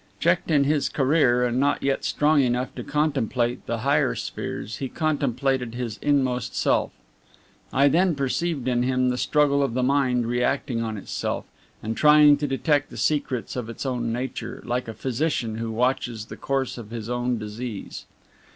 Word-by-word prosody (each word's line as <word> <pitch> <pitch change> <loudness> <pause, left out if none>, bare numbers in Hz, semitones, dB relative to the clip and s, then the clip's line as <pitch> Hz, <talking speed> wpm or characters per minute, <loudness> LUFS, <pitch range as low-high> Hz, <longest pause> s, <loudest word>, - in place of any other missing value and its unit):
Checked 170 +1 +1
in 145 -3 +4
his 145 0 +1
career, 130 -3 +3
and 120 +1 0
not 145 +1 +1
yet 135 0 0
strong 150 0 +3
enough 125 0 0
to - - -6
contemplate 125 -5 0
the - - -2
higher - - +2
spheres, 105 +1 -5
he 135 - -4
contemplated 135 -5 -1
his 120 -3 -4
inmost 130 -4 0
self. - - +1 0.8
I 140 +2 +4
then 170 +4 +3
perceived 140 0 -1
in 120 -1 +2
him 130 0 +1
the 125 - -1
struggle 145 -2 +2
of 135 -4 -1
the 130 - +1
Mind 130 -3 +2
reacting 120 0 0
on 110 -2 -3
itself, 95 - -3 0.4
and 110 +1 -3
trying 150 0 +6
to 145 0 -2
detect 145 +2 +1
the - - -10
secrets 140 -5 -1
of 120 -3 -4
its 115 - -6
own 120 -3 -1
nature, 125 +2 -5
like 125 0 -2
a 115 - -6
physician 125 -4 -1
who 115 0 -3
watches 120 -1 -1
the - - -9
course 135 -2 -2
of 110 -3 -9
his 115 -1 -6
own 120 0 -1
disease. 105 0 -6
130 Hz, 170 wpm, -24 LUFS, 120-145 Hz, 0.8 s, trying